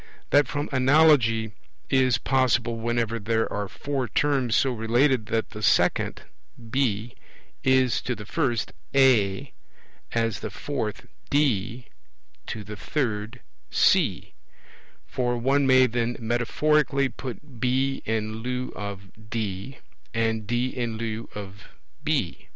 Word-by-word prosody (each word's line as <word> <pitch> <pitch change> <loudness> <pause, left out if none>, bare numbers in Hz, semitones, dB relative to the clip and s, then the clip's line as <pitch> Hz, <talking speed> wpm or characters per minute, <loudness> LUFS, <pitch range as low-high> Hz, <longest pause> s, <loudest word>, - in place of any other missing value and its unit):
That 145 0 +5
from 145 0 -2
analogy 130 -5 +4 0.4
is 130 - +3
possible 125 -3 +1
whenever 115 0 -1
there 110 +1 0
are 105 0 -2
four 135 +5 -3
terms 130 -1 +1
so 135 - +3
related 120 +1 +2
that 115 0 -1
the 105 - -8
second - - +2 0.5
(B) 120 -3 0 0.5
is 130 -2 +3
to 125 - -2
the 105 -1 -9
first 120 -3 -1 0.2
(A), 130 -2 +3 0.6
as 115 -1 0
the - - -5
fourth - - -4 0.2
(D) 125 -4 +1 0.6
to 110 - -5
the 105 +1 -8
third 115 -1 -3 0.3
(C); - - +2 0.7
for 120 -1 -1
one 135 +3 +2
may 130 0 +6
then 120 0 -1
metaphorically 135 +5 +1
put 130 0 -9
B 130 +2 0
in 110 0 -2
lieu 125 +2 -3
of 100 -2 -6 0.3
D, 105 +2 -4 0.4
and 110 -2 0
D 120 +2 0
in 120 -3 -3
lieu 115 0 -4
of 100 -1 -8 0.4
B. - - -1
120 Hz, 120 wpm, -25 LUFS, 110-130 Hz, 0.7 s, may